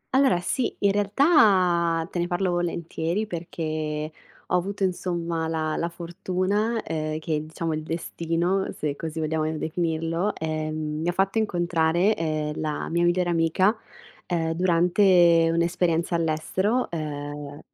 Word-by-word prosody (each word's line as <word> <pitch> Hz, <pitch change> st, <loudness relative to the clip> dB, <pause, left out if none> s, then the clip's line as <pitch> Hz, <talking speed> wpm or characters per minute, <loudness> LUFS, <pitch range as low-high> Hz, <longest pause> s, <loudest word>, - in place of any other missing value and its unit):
Allora, 265 Hz, -9 st, +4 dB
sì. 245 Hz, +7 st, -1 dB
In 200 Hz, -, +4 dB
realtà 195 Hz, -, +3 dB
te 175 Hz, -, -3 dB
ne 175 Hz, -, 0 dB
parlo 180 Hz, +1 st, 0 dB
volentieri 170 Hz, +2 st, -2 dB
perché 155 Hz, -4 st, -4 dB, 0.3 s
ho -, -, 0 dB
avuto 195 Hz, +3 st, -1 dB
insomma 170 Hz, -3 st, -1 dB
la 155 Hz, -1 st, -1 dB
la 170 Hz, -, -1 dB
fortuna, 185 Hz, +6 st, -1 dB
ehm, 155 Hz, -1 st, -3 dB
che 155 Hz, -1 st, -2 dB
diciamo 160 Hz, +1 st, -3 dB
il 155 Hz, -, -2 dB
destino, 170 Hz, +3 st, -1 dB
se 150 Hz, -2 st, -2 dB
così 160 Hz, +1 st, -5 dB
vogliamo 155 Hz, 0 st, 0 dB
definirlo, 165 Hz, +4 st, -1 dB
ehm, 155 Hz, -1 st, -3 dB
mi 175 Hz, +2 st, +1 dB
fatto 195 Hz, +4 st, +1 dB
incontrare, 175 Hz, -1 st, +2 dB
ehm, 155 Hz, -2 st, -2 dB
la 155 Hz, -1 st, -3 dB
mia 170 Hz, +1 st, +1 dB
migliore 175 Hz, 0 st, +2 dB
amica, 170 Hz, +5 st, +2 dB, 0.5 s
ehm, 165 Hz, -2 st, 0 dB
durante 175 Hz, -1 st, +4 dB
un'esperienza 170 Hz, 0 st, +1 dB
all'estero, 170 Hz, +8 st, 0 dB
ehm, 145 Hz, -2 st, -5 dB
170 Hz, 130 wpm, -25 LUFS, 160-185 Hz, 0.5 s, Allora